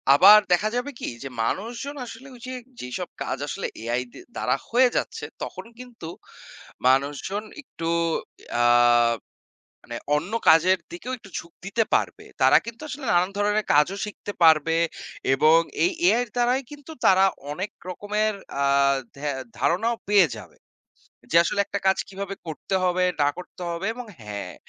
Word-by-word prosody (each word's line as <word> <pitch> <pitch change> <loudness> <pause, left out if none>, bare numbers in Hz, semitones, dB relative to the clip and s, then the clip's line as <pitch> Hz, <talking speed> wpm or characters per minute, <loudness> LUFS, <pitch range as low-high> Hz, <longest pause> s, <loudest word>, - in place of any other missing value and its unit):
আবার 205 +7 +9
দেখা 210 +5 +2
যাবে 250 +4 -2
কি? - - -4 0.2
যে 135 - -5
মানুষজন 235 - -3
আসলে 245 +3 -10
ওইযে 255 +2 -8 0.3
যেসব 125 0 -5
কাজ - - -3
আসলে - - -3
AI 120 +2 -1
দি - - -11 0.2
দ্বারা - - +1
হয়ে 250 +2 +5
যাচ্ছে - - -3 0.2
তখন - - -7
কিন্তু 245 -9 -10 0.8
মানুষজন 145 +10 +1 0.2
একটু 165 - -8 0.7
আ - - +4 1.2
মানে - - -6 0.2
অন্য 165 +7 -2 0.2
কাজের 175 +4 +5
দিকেও 330 -7 -6
একটু 200 - -15
ঝুঁক 170 - -13
দিতে 215 +4 +1
পারবে। - - -1 0.2
তারা - - +7
কিন্তু 235 +2 -8
আসলে 290 -2 -6
নানান 175 +1 +3
ধরনের 210 +1 +1
কাজও 150 +7 +3
শিখতে 205 0 -7
পারবে 160 0 +5 0.6
এবং 155 +4 +5 0.2
এই 355 - +3 0.2
AI-র 245 -3 +3
দ্বারাই 245 +2 +2
কিন্তু 290 +1 -11
তারা 190 0 +6 0.3
অনেক 185 +7 -4 0.2
রকমের 210 +3 -1 0.3
আ - - +3 0.5
ধে 140 - -11 0.4
ধারণাও 225 +7 +1
পেয়ে 200 -4 +6
যাবে। - - -13 0.7
যে 165 - +5
আসলে 185 - -1
একটা 200 0 -3
কাজ 190 - +4
কিভাবে 195 0 -5
করতে 160 +4 -6
হবে 180 0 +2 0.2
না 145 - +4
করতে 180 0 -10
হবে 170 +3 -4
এবং 250 0 -7 0.2
হ্যাঁ, 100 -4 -6
195 Hz, 150 wpm, -24 LUFS, 165-235 Hz, 1.2 s, আবার